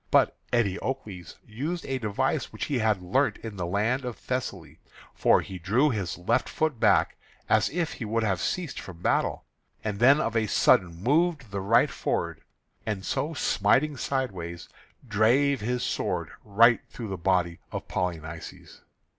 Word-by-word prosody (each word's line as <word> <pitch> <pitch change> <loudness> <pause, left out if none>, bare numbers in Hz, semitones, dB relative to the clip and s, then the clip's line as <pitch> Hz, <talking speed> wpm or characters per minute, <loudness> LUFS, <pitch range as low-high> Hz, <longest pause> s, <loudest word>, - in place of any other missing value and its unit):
But - - +4 0.2
Eteocles 105 -4 -2
used 150 +11 -4
a 135 -1 -2
device 105 -4 -1
which - - -4
he 140 -4 -1
had 110 -4 +1
learnt 130 +11 +1
in 110 -3 -6
the 90 -2 -2
land 110 +8 0
of 125 -2 -4
Thessaly; 100 -10 -4 0.3
for - - +4
he 95 -1 -8
drew 120 - +2
his 100 -6 -3
left 90 - 0
foot 155 -6 -1
back, - - +3 0.3
as - - +3
if 170 -1 -2
he 120 - -6
would 115 +1 0
have 95 -5 0
ceased 180 -5 -2
from 90 -3 -9
the 85 - -17
battle, - - +1 0.4
and 105 -2 -3
then 135 +5 +6
of 115 -5 -1
a 110 -1 +2
sudden 90 -4 +3
moved 150 - +1
the 100 -1 -3
right 110 +5 +4
forward; - - -2 0.4
and 100 -4 -3
so 160 +2 -2
smiting 135 +6 +2
sideways, 95 -13 -3 0.4
drave 120 +6 +3
his 125 +3 -1
sword - - -2
right 115 +3 +5
through 115 -4 -7
the 95 - -3
body 90 -1 0
of - - -5
Polynices. 80 -2 -5
110 Hz, 165 wpm, -27 LUFS, 95-130 Hz, 0.4 s, then